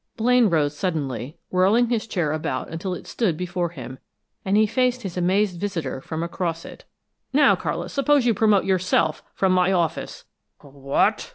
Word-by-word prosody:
Blaine 245 -1 +4
rose 150 -3 +1
suddenly, 145 - -3
whirling 200 +6 +3
his 225 -2 -1
chair 170 -8 -1
about 140 -5 -3
until 180 +3 -4
it - - -10
stood 190 -10 -1
before 175 0 -2
him, 130 -5 -9 0.4
and 195 +2 +1
he 215 - +5
faced 250 +2 0
his 190 -3 -5
amazed 185 +1 +1
visitor 165 -10 -3
from 160 +3 -4
across 170 -1 -3
it. - - -12 0.5
"Now, 290 +2 +5
Carlis, - - -4
suppose 280 -1 +3
you 235 - +4
promote 210 -1 +3
yourself 185 -4 +1
from 190 -1 +2
my 185 0 +3
office!" 170 -4 -2 0.3
"Wh 140 - -18
what!" 140 0 0
180 Hz, 170 wpm, -23 LUFS, 160-210 Hz, 0.5 s, he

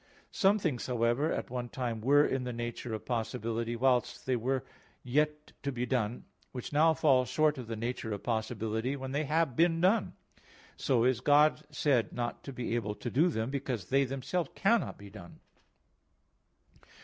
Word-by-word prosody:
Some 200 0 +3
things, 155 - -2
however, 120 +4 +1
at - - -3
one 125 -1 -3
time 120 -4 -3
were 145 +5 +5
in 130 -1 -1
the 125 - -3
nature 120 -1 -4
of 110 - -8
possibility, 115 0 -2
whilst 125 0 +1
they 130 - +1
were 130 +3 -1 0.4
yet 150 +4 0
to 140 - -2
be 125 -1 -2
done, 120 -2 -1 0.3
which 125 +2 -6
now 160 +2 +5
fall 130 -3 +4
short 150 +2 +1
of 125 - -7
the 115 - -4
nature 115 0 -3
of 100 - -4
possibility, 110 +2 -2
when 130 -1 -6
they 145 +3 -1
have 155 -3 +1
been 165 +1 +3
done. 190 +5 +2 0.6
So 120 -4 +1
is 125 -2 +2
God 150 +3 +4
said 145 -5 +1
not 120 -1 -4
to 140 - -5
be 125 -3 -4
able 105 -3 -1
to 120 - -5
do 160 +7 +4
them, 115 -4 -2
because 130 -8 -3
they 135 +1 +4
themselves 135 +5 -2
cannot 225 +4 +1
be 100 -1 -12
done. 90 -5 -12
125 Hz, 175 wpm, -31 LUFS, 115-145 Hz, 0.6 s, were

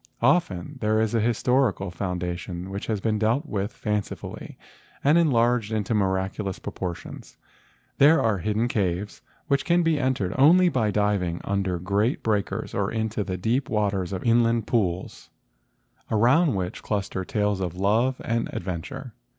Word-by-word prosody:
Often 135 - +1
there 110 0 +2
is 110 0 0
a 115 - +2
historical 120 -3 +1
foundation 90 0 -4
which 100 +1 -5
has 110 -3 -1
been 110 +1 0
dealt 115 +8 +1
with 100 -5 -3
fancifully 105 -3 -4 0.5
and 145 +3 +5
enlarged 120 -8 +3
into 110 0 -1
miraculous 95 -1 -1
propor¬ 90 -2 -4
tions. - - -11 0.6
There 150 +4 +7
are 110 -4 +1
hidden 105 +6 0
caves, 100 -3 -2 0.3
which 140 -1 +1
can 175 0 +3
be 165 -2 +2
entered 130 -9 0
only 175 +6 +6
by 115 -9 +1
diving 100 -5 0
under 95 -2 -1
the 85 - -10
great 105 +6 0
breakers 105 -3 -1
or - - -1
into 110 -1 -1
the 95 -2 -4
deep 115 +7 0
waters 100 -4 0
of 95 -2 -4
inland 115 -1 +3
pools, 95 -6 -2 0.8
around 125 - +3
which 90 -2 -3
cluster 100 -3 -2
tales 105 0 0
of 90 -2 -3
love 110 +7 +1
and 115 0 -1
adventure. 105 - -5
105 Hz, 150 wpm, -25 LUFS, 95-120 Hz, 0.8 s, There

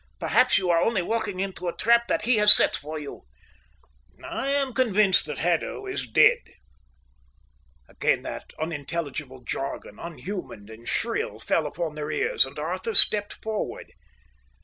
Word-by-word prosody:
Perhaps - - +2
you 185 -2 0
are 165 0 +2
only 215 -6 0
walking 205 -2 -4
into 190 -2 -5
a 170 - -5
trap 235 +1 +2
that - - -2
he 240 +1 +2
has 210 0 +8
set - - +6
for 155 +2 -7
you." 145 -2 -10 1.0
"I 270 - -5
am 275 -2 0
convinced 215 -8 +1
that 150 -2 -6
Haddo 175 - -2
is 385 0 -5
dead." - - +4 1.5
Again - - -2
that - - -9
unintelligible 150 -4 -6
jargon, 130 -4 -7
unhuman 170 - -9
and 115 +2 -11
shrill, 105 - -3
fell 150 +7 -2
upon 165 +1 -5
their 150 0 -7
ears, 150 -3 +1
and 135 - -14
Arthur 185 +8 -5
stepped 205 +1 +9
forward. 220 -1 -6
175 Hz, 150 wpm, -24 LUFS, 150-215 Hz, 1.5 s, stepped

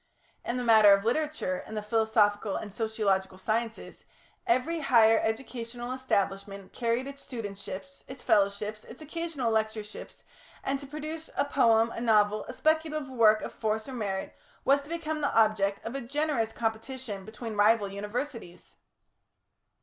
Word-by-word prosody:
In 240 - -2
the 250 - -2
matter 220 -3 +7
of 200 +1 +1
literature 250 -7 -1
and 220 - -6
the 210 - -3
philosophical 210 -2 +2
and 205 -3 -5
sociological 200 -4 0
sciences, 225 +3 -3 0.4
every 335 +1 +1
higher 230 -6 +5
educational 240 +1 -4
establishment 200 -6 -2
carried 235 +1 0
its 280 0 -8
studentships, 195 -5 -7
its 260 -1 -10
fellowships, 205 +1 +1
its 250 +7 -11
occasional 310 -6 -2
lectureships, 220 -1 -3 0.4
and 275 0 -1
to 280 - -9
produce 310 +2 -6
a 280 - +3
poem, 230 -5 +3
a 230 - -5
novel, 210 -2 +3
a - - -7
speculative 310 -1 0
work 220 -4 +4
of - - -6
force 220 0 -2
or 265 - -7
merit, 200 -5 -3 0.3
was 280 +1 +4
to 285 - -14
become 315 -2 -3
the 285 - 0
object 210 -3 +2
of 230 - -4
a 275 - -3
generous 275 -3 -1
competition 225 -2 -4
between 220 +2 -7
rival 210 0 +4
Universities. 210 0 -6
225 Hz, 150 wpm, -29 LUFS, 210-265 Hz, 0.4 s, matter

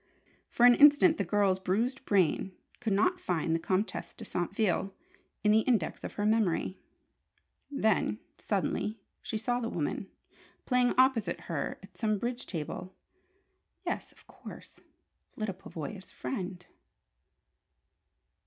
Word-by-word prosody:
For 240 - +4
an 245 - +9
instant 295 +5 +6
the - - +2
girl's 200 -3 +2
bruised 230 +9 -1
brain 190 -1 +2 0.3
could 225 -4 0
not 360 - +2
find 165 -2 -1
the 165 - +1
Comtesse 190 +5 -2
de 225 - -9
Saintville 195 +1 -1 0.5
in 210 - +4
the 215 - +6
index 220 -7 0
of - - -5
her 205 - -2
memory. 210 -4 +1 0.9
Then, 220 -6 +1 0.2
suddenly, 210 +2 -1 0.2
she 220 - -3
saw 245 +3 0
the 230 -2 -2
woman, 175 +3 -3 0.6
playing 250 -1 +3
opposite 255 -4 +3
her - - -3
at - - -15
some 215 -3 +1
bridge 240 +4 -3
table. 180 +2 -5 0.9
Yes, - - -3
of - - -22
course, - - -12 0.6
Lyda 215 -3 -2
Pavoya's 185 +1 -8
friend. 185 -7 -5
210 Hz, 125 wpm, -30 LUFS, 185-240 Hz, 0.9 s, an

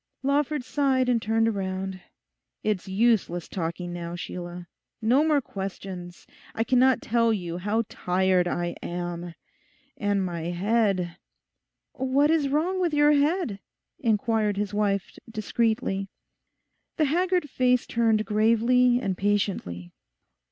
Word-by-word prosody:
Lawford 285 0 +1
sighed 260 -2 +1
and 240 -2 +2
turned 225 +1 +1
round. 190 -1 -4 0.6
'It's 210 -4 -1
useless 190 -4 +1
talking 175 0 -4
now, 170 0 -5
Sheila. 175 0 -7 0.3
No 245 +7 +3
more 305 -2 +3
questions. 190 -4 -7 0.3
I 225 - +1
cannot 255 +1 +3
tell 230 0 +2
you 175 -5 -3
how 210 +5 0
tired 180 0 +1
I 175 0 -2
am. 175 -1 -5 0.6
And 205 -2 0
my 170 -2 -4
head—' 185 -1 0 0.8
'What 270 +3 +2
is 305 -4 +2
wrong 345 +6 0
with 340 -4 +1
your 295 0 +5
head?' 295 - +1 0.4
inquired 220 -4 +1
his 205 0 -2
wife 200 -2 -1
discreetly. 215 -3 -1 0.9
The 310 - +3
haggard 355 +2 +1
face 250 -2 +2
turned 225 -2 +1
gravely 230 +4 +3
and 195 -6 -2
patiently. 190 - -1
215 Hz, 120 wpm, -26 LUFS, 185-255 Hz, 0.9 s, your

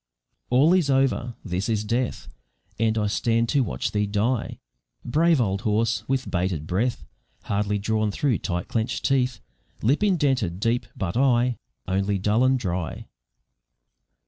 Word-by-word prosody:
All 140 +8 +5
is 180 -6 +2
over! 135 -3 +1
this 95 +3 -2
is 110 -2 0
death, 115 - -2 0.5
And 110 0 +2
I 105 - +1
stand 115 +2 +1
to 145 - +2
watch 65 - -3
thee 105 0 0
die, 110 +4 -1 0.5
Brave 160 +4 +3
old 100 -4 0
horse! 110 0 0
with 135 0 -1
'bated 90 -4 -1
breath 105 +9 -1 0.4
Hardly 105 0 0
drawn 110 +1 0
through 125 +4 0
tight 90 -1 -3
clenched 120 +2 -2
teeth, 125 -4 +1 0.4
Lip 135 - +2
indented 135 - +1
deep, 115 +3 0
but 85 -4 -3
eye 125 -2 +2 0.3
Only 95 +2 0
dull 105 +5 +2
and 130 0 +4
dry. 90 -7 -3
115 Hz, 145 wpm, -24 LUFS, 100-130 Hz, 0.5 s, All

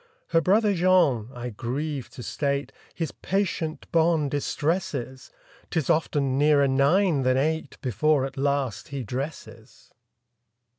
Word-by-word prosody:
Her 165 - +3
brother 205 +4 +3
Jean—I 135 - +2
grieve 130 +3 -4
to 125 0 -10
state— 140 +1 -2 0.2
His 165 -4 -3
patient 175 -5 -2
bonne 160 -3 +2
distresses; 145 -3 -2 0.4
'Tis 160 -6 0
often 140 -4 +1
nearer 145 -1 +4
nine 140 +4 +3
than 130 0 +2
eight 155 +1 -1
Before 135 +4 +2
at 135 - -7
last 140 -4 -1
he 140 -2 -5
dresses. 120 -2 -7
140 Hz, 115 wpm, -25 LUFS, 130-160 Hz, 0.4 s, nearer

